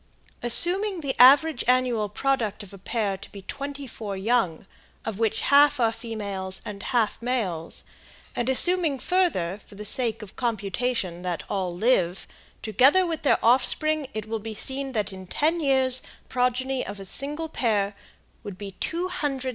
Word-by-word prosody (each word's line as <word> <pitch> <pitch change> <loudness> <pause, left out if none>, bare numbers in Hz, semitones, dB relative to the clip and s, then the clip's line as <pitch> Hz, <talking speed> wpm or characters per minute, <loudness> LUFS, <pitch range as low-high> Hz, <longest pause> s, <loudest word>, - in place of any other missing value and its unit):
Assuming 355 - +4
the 275 -3 -3
average 280 +2 +6
annual 250 -4 +2
product 225 -3 -1
of 200 - -14
a 195 - -11
pair 200 -1 -2
to 195 - -12
be 200 -1 -10
twenty 280 +5 -6
four 210 -5 -6
young, 195 -5 0 0.4
of 225 -2 -4
which 225 -2 0
half 290 0 +5
are 230 -2 +3
females 200 -5 -4
and 200 -1 -7
half 235 -1 0
males, 205 -10 -2 0.5
and 240 +1 -1
assuming 330 +1 +5
further, 255 - 0
for - - -15
the 210 +1 -8
sake 230 0 0
of 200 - -12
computation, 220 -4 -2
that 180 -2 -3
all 190 -3 -1
live, 185 -2 +1 0.4
together 265 - +4
with 330 -2 -3
their 285 - +3
offspring, 285 +5 +3
it 215 -1 -4
will 225 0 -3
be 220 +1 -7
seen 270 +3 -3
that 210 -3 -2
in 190 -1 -10
ten 320 - 0
years 265 -3 +2
the - - -17 0.2
progeny 255 +1 0
of 200 +1 -7
a 195 - -8
single 295 - 0
pair 210 -9 0 0.5
would 200 -3 -8
be 200 0 -7
275,716,983,698. 330 -6 -2
240 Hz, 165 wpm, -25 LUFS, 200-275 Hz, 0.5 s, average